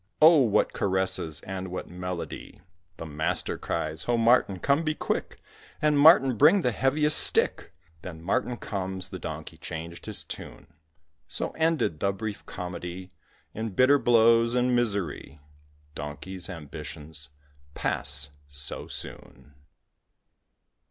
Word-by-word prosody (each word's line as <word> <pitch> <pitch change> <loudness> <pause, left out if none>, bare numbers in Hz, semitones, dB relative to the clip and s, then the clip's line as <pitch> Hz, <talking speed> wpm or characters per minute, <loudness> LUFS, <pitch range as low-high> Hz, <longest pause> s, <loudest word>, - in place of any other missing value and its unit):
"Oh, 160 +1 +8
what 115 -6 +2
caresses, 95 -5 -1
and 95 0 -5
what 90 0 -6
melody!" 90 -1 -6 0.4
The - - -7
master 80 +3 0
cries; 80 +1 -3
"Ho! 120 -1 +1
Martin, 115 -4 +3
come, 140 - +2
be 155 -2 -1
quick! - - -3 0.4
And, 150 -1 +2
Martin, 135 -5 +7
bring 165 - +6
the 125 - +2
heaviest 145 +6 +3
stick!" - - +2 0.3
Then 85 -3 -8
Martin 125 +6 -1
comes; 95 -3 -4
the - - -6
donkey - - -7
changed 85 +1 -7
his - - -3
tune. - - -9 0.6
So 85 - -1
ended 160 - 0
the 100 - +1
brief 105 +1 -6
comedy 90 0 -6 0.4
In 110 -3 -5
bitter 140 +5 +5
blows 115 0 +4
and 125 0 +2
misery. 100 - -2 0.5
Donkeys' 80 +7 -6
ambitions 75 -2 -9 0.5
pass 70 0 0 0.2
so 70 0 -2
soon. 75 - -8
95 Hz, 125 wpm, -27 LUFS, 85-125 Hz, 0.6 s, Oh